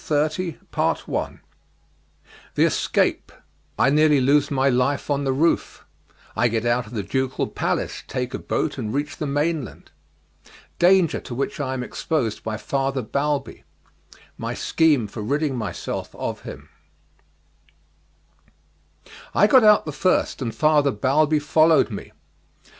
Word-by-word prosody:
CHAPTER 155 +3 0 0.2
XXX - - -2 1.1
The - - +3
Escape - - 0 0.5
I 135 - +3
Nearly 150 -1 +4
Lose 140 +3 +3
My 135 -1 +1
Life 135 +3 +1
on 140 0 0
the 135 - +1
Roof 155 +6 0 0.5
I 120 - +3
Get 115 0 -2
out 120 0 +1
of 110 - -12
the 105 -4 -3
Ducal 130 +4 -1
Palace, - - -2
Take - - -4
a - - -3
Boat, - - -2
and 105 - -3
Reach 145 +1 -3
the 150 - -3
Mainland 145 - -2 0.9
Danger 180 -2 +4
to 120 - -8
Which 140 +3 -3
I 130 -2 -2
Am 125 - -3
Exposed 125 - -2
by 110 -1 -3
Father 135 +3 -2
Balbi 140 +4 -2 0.8
My - - -4
Scheme 150 -8 +2
for 105 +2 -7
Ridding 140 +5 -1
Myself 110 -4 -5
of - - -4
Him - - -10 2.7
I - - +6
got 250 +3 +6
out 210 -1 +6
the 155 - -4
first, 180 0 0
and 115 -3 -3
Father 150 -2 +3
Balbi 145 +7 +2
followed 155 -1 +3
me. 100 - -7
140 Hz, 135 wpm, -23 LUFS, 125-155 Hz, 2.7 s, I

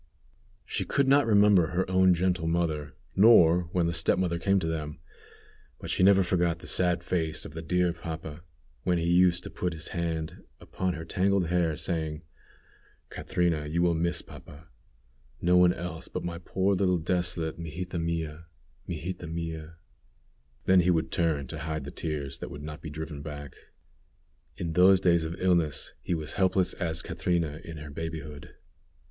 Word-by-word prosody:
She - - -2
could 140 -1 +1
not 140 -1 +5
remember 100 -5 +5
her 90 +3 -1
own 95 0 +4
gentle 90 -1 0
mother, 80 -5 -1 0.2
nor 90 -5 +6
when 90 -2 +1
the 85 - 0
step 85 +1 +2
mother 85 -2 0
came 100 +3 +2
to 85 - -3
them, 75 -2 -3 0.8
but - - -5
she - - 0
never 95 0 +6
forgot 85 -2 +1
the - - -13
sad 90 -1 +1
face 80 -3 -2
of - - -9
the 80 - -5
dear 90 +1 +1
papa, 80 -2 -7 0.4
when 90 +3 +1
he 85 0 -1
used 90 0 +4
to - - -7
put 90 -1 -2
his 80 0 -6
hand 80 -2 -3 0.2
upon 95 -1 -3
her 80 +1 -7
tangled 95 0 +1
hair, 85 -3 +1
saying: 80 -3 -3 0.9
"Catrina, 85 -4 -1
you 85 +3 0
will 85 -1 +3
miss 85 +1 0
papa; 80 +3 -13 0.7
no 90 +4 +3
one 90 0 +6
else 90 -2 -6
but - - -5
my 85 -1 -4
poor 95 +3 0
little 90 -1 +2
desolate 85 -1 -1
Mijita 85 +2 -5
mia, 80 -1 -3 0.4
Mijita 85 +1 -5
mia." 80 -1 -5 0.9
Then 95 0 +5
he 90 0 +3
would 80 -3 +1
turn 80 -5 0
to 75 +4 -6
hide 80 0 -3
the 70 - -7
tears 70 -4 -4
that - - -6
would 75 - -8
not 75 +1 -7
be 80 - -6
driven 75 -1 -6
back. 70 -2 -7 1.0
In 85 -2 -3
those 95 +2 +6
days 85 -3 +3
of 80 +1 -4
illness 85 -5 +1
he 90 - -1
was 80 -2 -4
helpless 95 -1 +2
as 80 -1 -3
Catrina 85 -3 -1
in 80 -2 -8
her 75 -1 -8
babyhood. 80 -2 -7
85 Hz, 170 wpm, -28 LUFS, 80-90 Hz, 1.0 s, nor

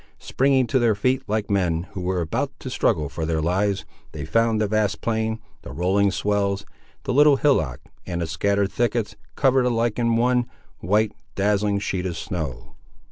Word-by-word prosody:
Springing 135 -1 +2
to 130 +2 +1
their 115 -3 +3
feet, 125 +5 +1
like 105 -1 -1
men, 85 -4 +1
who 100 -2 -6
were 90 0 -1
about 80 - -2
to - - -7
struggle 75 -2 +1
for 80 +3 -5
their 80 0 0
lives, 95 +5 0 0.3
they 75 -1 -5
found 115 +6 +2
the 110 - +2
vast 105 -1 0
plain, 110 -1 -1 0.2
the - - -9
rolling 95 +7 +2
swells, 100 0 -1 0.4
the 130 - -2
little 145 +1 +6
hillock, 80 - +1 0.3
and 85 -1 -3
the - - 0
scattered 100 +5 0
thickets, 115 -3 -1 0.2
covered 130 -2 +3
alike 115 -1 0
in 115 -1 +2
one, 125 +1 +2 0.3
white, 105 +5 +1 0.2
dazzling 100 0 +1
sheet 95 -2 -2
of 85 -3 -4
snow. 80 - -5
100 Hz, 175 wpm, -23 LUFS, 90-115 Hz, 0.4 s, little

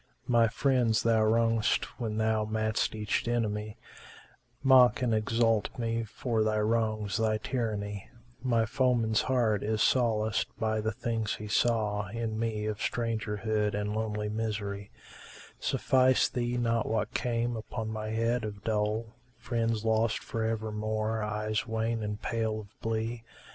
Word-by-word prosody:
My 115 -2 +4
friends 120 -2 +2
thou 115 -1 +3
wrongedst 115 0 +2
when 110 -3 -2
thou 110 0 +2
madst 110 0 0
each 105 +2 -1
enemy 105 -3 -1 0.4
* 120 0 -29
Mock 125 +1 +6
and 120 -2 +2
exult 115 0 +2
me 115 -1 -1
for 115 +1 -1
thy 110 0 +1
wrongs, 110 -2 0
thy 110 -1 +1
tyranny: 105 -4 -3 0.3
My 115 -3 +2
foeman's 120 -3 +2
heart 115 -6 +1
is 110 0 +1
solaced 110 -4 +2
by 110 -1 0
the 110 +1 -1
things 110 -1 -2
he 105 - -7
saw 105 -1 +1
* 105 - -11
In 115 -2 -2
me, 110 -2 -1
of 105 -1 -2
strangerhood 110 -2 -1
and 105 0 -2
lonely 105 -1 -2
misery: 105 -2 -3 0.7
Suffice 130 0 +3
thee 120 -1 -1
not 115 -2 +1
what 110 -1 -1
came 120 0 0
upon 110 0 -5
my 110 0 -4
head 115 +2 0
of 105 -1 -6
dole, 110 +1 -1
* 125 0 -35
Friends 115 -2 -1
lost 110 0 +2
for 115 - -3
evermore, 110 0 -1
eyes 105 +1 -2
wan 110 +1 -1
and 105 -1 -3
pale 110 -1 -1
of 105 0 -18
blee? 115 +1 -2
110 Hz, 150 wpm, -30 LUFS, 105-115 Hz, 0.7 s, Mock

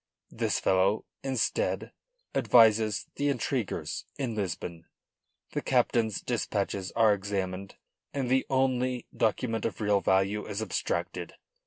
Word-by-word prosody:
This - - 0
fellow, 95 +3 +2 0.2
instead, 135 - 0 0.4
advises 110 -3 +4
the 145 0 +1
intriguers 125 -3 -2
in 130 -5 -2
Lisbon. 85 -4 -4 0.7
The - - -2
captain's 110 -4 +1
dispatches 100 -5 -2
are 110 -2 +5
examined 95 -1 -3 0.4
and 135 -3 -2
the 130 +1 +2
only 130 -2 +1
document 115 0 0
of 115 - -2
real 105 -2 +2
value 95 +3 +1
is 105 -1 -3
abstracted. 110 - -2
110 Hz, 115 wpm, -29 LUFS, 100-125 Hz, 0.7 s, are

